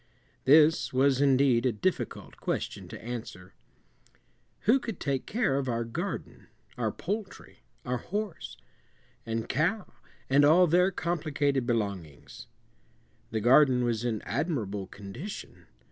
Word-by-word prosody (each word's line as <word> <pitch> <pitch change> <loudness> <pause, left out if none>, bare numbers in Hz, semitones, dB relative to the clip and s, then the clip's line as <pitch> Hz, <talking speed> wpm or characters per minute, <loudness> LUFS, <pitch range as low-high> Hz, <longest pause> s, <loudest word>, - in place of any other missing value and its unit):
This 155 +4 +5
was 135 0 +3
indeed 135 -3 +4
a 130 - +2
difficult 115 - -3
question - - -3
to - - -9
answer. 110 -6 -7 1.1
Who 240 +6 +4
could 225 -7 -6
take 140 -2 -2
care 210 - +1
of 135 -2 -2
our 115 -1 -1
garden, 170 +12 -5 0.3
our - - -1
poultry, 205 -2 -6 0.3
our 125 0 -1
horse, 200 - -5 0.7
and 115 0 -2
cow, 180 - -1 0.3
and 140 +2 +4
all 165 +5 +6
their 180 +3 +4
complicated 150 -7 -1
belongings? 100 - -4 0.8
The 110 -1 -2
garden 125 +1 +5
was 120 -1 -1
in 115 -3 -2
admirable 115 - -2
condition. 105 - -9
135 Hz, 120 wpm, -28 LUFS, 115-170 Hz, 1.1 s, all